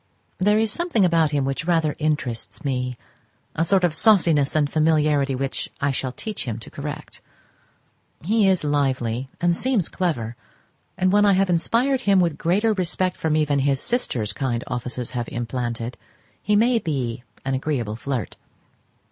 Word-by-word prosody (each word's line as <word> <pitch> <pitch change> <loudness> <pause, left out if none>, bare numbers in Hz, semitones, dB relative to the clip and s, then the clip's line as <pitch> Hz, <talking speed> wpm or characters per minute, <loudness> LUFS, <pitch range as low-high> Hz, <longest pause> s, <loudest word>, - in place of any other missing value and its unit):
There 210 +3 +3
is 220 -1 +1
something 330 - +1
about 165 -3 +3
him 140 -2 0
which 135 +4 -2
rather 165 -3 +1
interests 150 -2 -2
me, 125 -2 -2 0.6
a 165 - +1
sort 185 +2 +3
of 175 -3 +2
sauciness 160 -6 +3
and 150 -2 +3
familiarity 150 -3 +2
which 135 +1 -3
I 140 0 +1
shall 130 -1 -2
teach 215 - -6
him 115 -3 -3
to 115 - -11
correct. 145 +1 -6 1.0
He 210 0 +3
is 185 -4 +2
lively, 130 -4 0
and 175 -1 +2
seems 240 -5 0
clever, 120 -11 -2 0.6
and 185 0 +2
when 205 +1 +4
I 200 -1 +5
have 190 0 +2
inspired 245 +10 +2
him 200 -5 +4
with 170 -4 +1
greater 205 +6 +2
respect 185 -1 0
for 160 - -2
me 155 0 +2
than 145 -1 +1
his 135 0 +1
sister's 125 - 0
kind 120 0 -2
offices 125 0 -4
have 120 -2 -3
implanted, 120 0 -4 0.4
he 210 +2 +1
may 230 +3 +4
be 130 - -3 0.2
an 135 - -1
agreeable 130 -6 -2
flirt. 125 -2 -4
150 Hz, 165 wpm, -23 LUFS, 130-185 Hz, 1.0 s, I